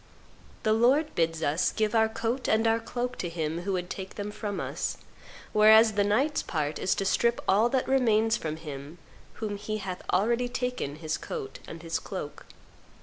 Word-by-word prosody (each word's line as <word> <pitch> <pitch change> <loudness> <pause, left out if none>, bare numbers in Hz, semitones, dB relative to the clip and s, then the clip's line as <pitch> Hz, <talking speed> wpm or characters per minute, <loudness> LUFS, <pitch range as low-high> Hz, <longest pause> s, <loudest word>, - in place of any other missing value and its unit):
The 215 - +3
Lord 265 +7 +3
bids 165 -1 0
us 150 +3 +2
give 215 -1 0
our 220 -1 +4
coat 235 +3 -2
and 220 +1 +3
our 225 0 +3
cloak 245 +2 -4
to 175 - -2
him 165 0 -3
who 195 +2 -2
would 180 -1 -2
take 190 +1 -7
them 205 0 -4
from 205 -1 -4
us; - - -3 0.6
whereas 220 +1 +7
the 205 -1 +2
knight's 260 +9 +2
part 150 -2 -2
is 185 - +1
to 195 - -2
strip 235 +4 +2
all 215 +5 +4
that 260 0 0
remains 225 -4 +3
from 155 -6 -3
him 150 0 -8 0.4
from 220 - -4
whom 205 - -4
he 215 +1 -3
hath 190 -3 -5
already 235 +6 +2
taken 250 - -3
his 155 0 -3
coat 430 -4 -6
and 165 0 -9
his 165 0 -1
cloak. - - -7
215 Hz, 190 wpm, -28 LUFS, 175-235 Hz, 0.6 s, whereas